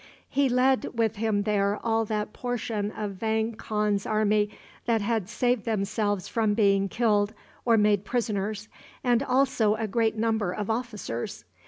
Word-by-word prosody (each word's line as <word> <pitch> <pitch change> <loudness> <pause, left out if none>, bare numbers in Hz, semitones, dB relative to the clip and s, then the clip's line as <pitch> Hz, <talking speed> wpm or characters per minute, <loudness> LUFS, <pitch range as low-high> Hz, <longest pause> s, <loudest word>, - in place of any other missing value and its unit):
He 280 -1 +2
led 255 0 +2
with 225 -2 +1
him 210 -2 +1
there 205 -1 +1
all 225 0 +2
that 210 0 -3
portion 225 -4 -2
of 210 -1 -4
Vang 220 +2 0
Khan's 210 -2 -1
army 215 -1 +2 0.4
that 230 -1 +3
had 215 -2 -1
saved 245 0 +1
themselves 205 -2 -1
from 220 -3 +1
being 195 -2 +3
killed 210 -1 +1 0.3
or 230 -2 +5
made 210 -2 +3
prisoners, 210 -2 -2 0.4
and 245 -1 +3
also 255 -5 +2
a 220 0 -2
great 225 +1 0
number 220 -4 +1
of 210 +2 -2
officers. 220 - -4
215 Hz, 150 wpm, -27 LUFS, 205-230 Hz, 0.4 s, or